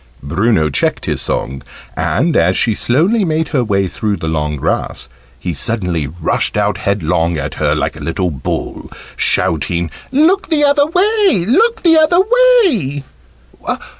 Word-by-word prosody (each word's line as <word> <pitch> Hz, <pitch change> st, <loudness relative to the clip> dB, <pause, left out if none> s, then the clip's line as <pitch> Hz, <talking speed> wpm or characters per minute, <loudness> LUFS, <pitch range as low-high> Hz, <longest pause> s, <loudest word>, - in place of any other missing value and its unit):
Bruno 85 Hz, -, +1 dB
checked 70 Hz, -, -1 dB
his -, -, -2 dB
song, 65 Hz, 0 st, -3 dB, 0.3 s
and, -, -, 0 dB
as 90 Hz, +3 st, +2 dB
she 115 Hz, -, +2 dB
slowly 170 Hz, -, +1 dB
made 160 Hz, -2 st, -1 dB
her 130 Hz, -4 st, 0 dB
way 100 Hz, -3 st, 0 dB
through 105 Hz, +3 st, -3 dB
the 80 Hz, -, -5 dB
long 75 Hz, -1 st, -2 dB
grass, 70 Hz, -, -3 dB, 0.3 s
he 85 Hz, +5 st, -4 dB
suddenly 90 Hz, -3 st, -2 dB
rushed 80 Hz, +3 st, -1 dB
out -, -, 0 dB
headlong 85 Hz, -4 st, 0 dB
at 75 Hz, 0 st, -4 dB
her -, -, +2 dB
like -, -, -2 dB
a -, -, -9 dB
little 90 Hz, +2 st, -2 dB
bull, 65 Hz, -, -5 dB, 0.2 s
shouting 85 Hz, +1 st, 0 dB, 0.2 s
"Look 345 Hz, +8 st, +2 dB
the 305 Hz, -3 st, +2 dB
other 285 Hz, 0 st, +3 dB
way! 380 Hz, -, +2 dB
Look 445 Hz, -, +2 dB
the 325 Hz, -2 st, +5 dB
other 315 Hz, +3 st, +3 dB, 0.5 s
way!" 145 Hz, -, -1 dB
110 Hz, 150 wpm, -15 LUFS, -, 0.5 s, the